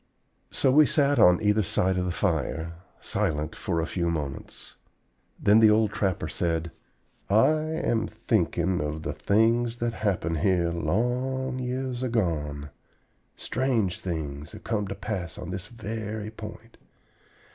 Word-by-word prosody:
So 130 - +2
we 150 +2 +6
sat 145 -1 +3
on 90 +2 +7
either 105 +1 +3
side 95 -2 +1
of 90 0 0
the 90 - -1
fire, 85 -2 -1 0.3
silent 75 +1 -1
for 85 -3 -2
a 80 - 0
few 85 0 -1
moments. 75 -4 -5 0.7
Then 105 +2 +5
the 110 -1 +7
old 105 -1 +3
trapper 95 -4 -1
said: 85 -1 -1 0.6
"I 110 +7 +5
am 155 -8 -1
thinking 95 -5 0
of 75 +1 -3
the 80 -2 -3
things 115 +3 +2
that 120 -1 -1
happened 90 -7 -1
here 85 -1 +2
long 125 - -1
years 125 0 -3
agone. 80 - -1 0.6
Strange 115 -7 0
things 75 -5 -5
have - - -11
come 105 -3 -1
to 100 - -5
pass 90 -7 -4
on 90 - -6
this 95 +2 -5
very 110 -1 -5
point. 110 +1 -10
100 Hz, 140 wpm, -27 LUFS, 85-115 Hz, 0.7 s, on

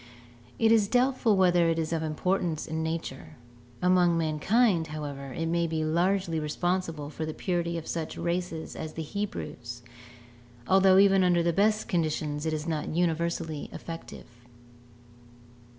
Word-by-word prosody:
It 225 0 +3
is 220 -3 +4
doubtful 245 -2 +2
whether 175 -2 +4
it 165 - +1
is 160 0 -1
of 165 - 0
importance 160 +1 -1
in 160 0 -3
nature; 160 -4 -5 0.5
among 180 -2 +4
mankind, 165 +4 +2
however, 145 -3 -6
it 165 +5 -3
may 170 +1 +1
be 160 -1 -1
largely 175 +1 +1
responsible 160 -1 -2
for 160 - -5
the 155 0 -4
purity 170 -2 -1
of 165 - -6
such 165 -2 -4
races 170 -2 -3
as 155 - -6
the 160 - -4
Hebrews, 125 - -5 0.8
although 190 0 +5
even 195 -1 +5
under 175 -2 +3
the 170 0 +1
best 210 +4 +2
of - - -19
conditions 155 -3 -1
it - - 0
is 155 0 -3
not 155 -2 -2
universally 165 -2 -1
effective. 165 0 -8
165 Hz, 150 wpm, -28 LUFS, 155-185 Hz, 0.8 s, although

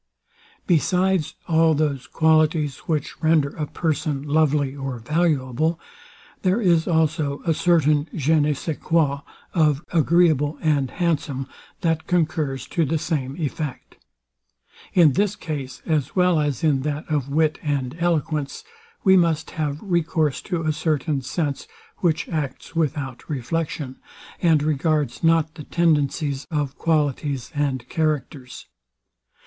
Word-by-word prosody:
Besides 180 -1 +1
all 160 -1 +4
those 145 -3 -1
qualities, 155 -3 +2
which 155 -4 -2
render 160 -3 +3
a 150 +1 -5
person 150 -3 -2
lovely 145 -2 +1
or 135 -3 -4
valuable, 155 +2 0 0.6
there 190 +3 +2
is 170 -6 +3
also 155 -3 0
a 165 - +3
certain 155 -3 +2
JE 160 +1 +2
NE 150 0 +2
SAIS 155 +2 -4
QUOI 145 -4 +1 0.3
of 155 -3 +2
agreeable 160 -3 +3
and 145 -4 +1
handsome, 150 -6 -1 0.4
that 165 -3 0
concurs 155 -6 0
to 170 - +1
the 160 +2 0
same 140 -3 -2
effect. 150 -3 -5 1.0
In 165 -6 +6
this 205 +3 +1
case, 145 -9 -6
as 155 -4 -1
well 180 -3 +3
as 145 -3 -1
in 145 -4 +3
that 150 +2 -3
of 145 -4 -1
wit 155 +2 +1
and 140 -3 -2
eloquence, 155 -4 -1 0.4
we 190 -2 +6
must 165 -3 +2
have 150 -4 -2
recourse 165 -6 0
to 175 -3 -3
a 155 -1 +1
certain 150 -2 -1
sense, 140 +2 -3 0.3
which 165 -3 0
acts 150 -3 -4
without 145 -5 -2
reflection, 145 0 -3 0.4
and 160 -4 +4
regards 150 -3 0
not 165 -1 +3
the 155 -2 -9
tendencies 145 -3 0
of 145 -4 -2
qualities 145 -4 -1
and 135 -4 -1
characters. 145 -5 -2
155 Hz, 130 wpm, -23 LUFS, 140-165 Hz, 1.0 s, In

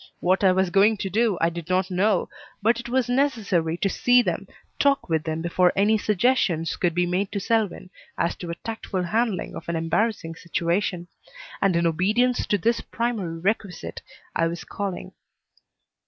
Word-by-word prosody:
What 185 +3 +1
I 190 - +6
was 185 -1 +1
going 205 +3 +4
to 195 -1 -4
do 220 -1 +2
I 165 +1 +3
did 170 0 -7
not 185 +1 +1
know, 190 +1 +2 0.3
but 230 +3 +2
it 240 - -7
was 255 0 +1
necessary 220 - +1
to 195 - 0
see 245 +5 +4
them, - - -2 0.3
talk 280 -1 +2
with 160 -3 0
them 160 0 -3
before 180 +1 +3
any 205 +3 +3
suggestions 205 -6 +1
could 170 -2 0
be 175 0 +2
made 185 +3 -1
to 200 - -1
Selwyn 205 -3 -1 0.3
as 170 - 0
to 175 - -7
a 170 - -3
tactful 210 -3 -4
handling 215 +1 -1
of - - -8
an 170 - -1
embarrassing 165 +2 0
situation; 170 +1 -2 0.5
and 195 -3 +3
in 170 0 +2
obedience 210 +10 +1
to 205 - +2
this 230 +6 +1
primary 220 -8 -3
requisite 180 - -3 0.3
I 165 - +2
was 170 0 -5
calling. 200 -3 -5
190 Hz, 175 wpm, -24 LUFS, 170-220 Hz, 0.5 s, I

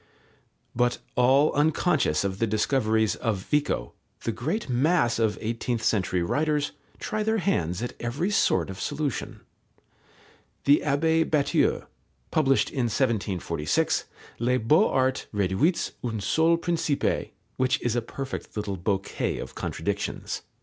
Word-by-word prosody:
But 120 0 +2 0.2
all 135 +4 +4
unconscious 145 - +2
of 95 0 -2
the 115 - +2
discoveries 110 0 +1
of 115 -5 -1
Vico, 150 +3 -1 0.3
the 115 - 0
great 150 - -3
mass 125 -1 +2
of 110 -2 +1
eighteenth 115 +1 -2
century 95 -5 +1
writers 150 - 0 0.3
try 215 - -3
their 220 +1 +1
hands 90 - 0
at 120 - -4
every 140 +12 -2
sort 95 - +2
of 95 - -8
solution. 145 -4 -3 1.2
The 145 +1 +5
Abbé 160 +3 +2
Batteux 145 -3 +2 0.5
published 135 -7 +2
in 130 -3 0
1746 100 - 0 0.3
Les 125 +2 +2
Beaux 155 - +4
arts 130 0 0
réduits 100 - +1
a - - -1
un 110 -2 -3
seul 160 +12 +3
principe, 165 -4 -1 0.3
which 130 0 +2
is 120 -1 0
a 120 - +1
perfect 135 0 -6
little 105 -2 -2
bouquet 95 +2 -1
of - - -7
contradictions. - - -3
125 Hz, 130 wpm, -26 LUFS, 105-150 Hz, 1.2 s, The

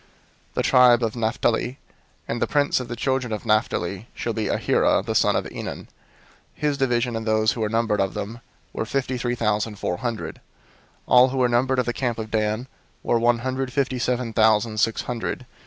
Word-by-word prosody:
002:029 - - -31 0.5
"The - - 0
tribe 125 -1 +5
of 110 0 -1
Naphtali: 120 +2 0 0.5
and 115 - -3
the - - +2
prince 145 -2 +2
of 125 - -5
the 120 - -5
children 130 0 -1
of 110 +2 -4
Naphtali 110 -2 0
shall 115 - -3
be 110 -1 -2
Ahira - - +2
the - - -2
son - - +3
of - - 0
Enan. - - -6
002:030 - - -19 0.7
His 150 -2 -1
division, 120 -2 +1
and 115 0 -4
those 110 0 +3
who 115 - -4
were 105 - 0
numbered 115 -2 +1
of 95 -1 -1
them, 115 +4 -5 0.3
were - - -2
fifty 130 0 -2
three 120 0 -1
thousand 105 -1 -1
four 90 - -2
hundred. 120 -1 -4 0.7
002:031 - - -19
"All 125 +1 +7
who 135 - -4
were 125 -1 +3
numbered 130 +2 +2
of 125 - +1
the 120 - -1
camp 120 -3 -2
of 110 -1 -6
Dan 110 +3 0 0.4
were 120 - +2
one 120 +1 +3
hundred 130 0 -2
fifty 130 -1 -1
seven 125 -1 -1
thousand 110 0 +3
six 115 0 +1
hundred. 125 +1 -4
120 Hz, 205 wpm, -23 LUFS, 110-125 Hz, 0.7 s, All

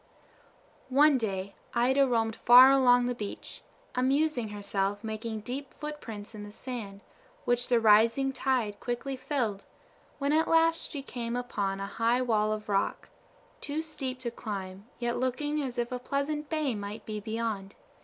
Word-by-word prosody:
One 280 +1 +5
day 195 -3 -3 0.2
Ida 265 +3 +4
roamed 225 -3 +1
far 250 +3 +8
along 245 -2 +5
the 245 - 0
beach, 210 -4 -7 0.3
amusing 265 -1 +1
herself 205 0 -2
making 220 0 -4
deep 260 +5 -6
footprints 230 -9 -7
in 210 - -8
the 205 - -9
sand, 210 -4 -7 0.4
which 245 0 +1
the 245 -2 +4
rising 230 +5 +4
tide 250 -6 0
quickly 250 +3 -3
filled, 240 -7 -2 0.5
when 280 +1 0
at 320 +1 +3
last 330 0 +3
she 285 -3 -6
came 235 -3 -4
upon 205 -6 -2
a 195 - -3
high 230 +5 +1
wall 215 -3 +1
of 215 0 -4
rock, 200 -1 -1 0.5
too 305 +2 -3
steep 270 -5 -4
to 240 -2 -3
climb, 195 -3 -6
yet 240 0 -1
looking 290 +4 -1
as 260 -3 -4
if 240 0 -1
a 250 - -3
pleasant 285 +3 -2
bay 310 -5 0
might 205 0 -6
be 215 -1 -4
beyond. 220 -2 -4
240 Hz, 155 wpm, -29 LUFS, 210-270 Hz, 0.5 s, far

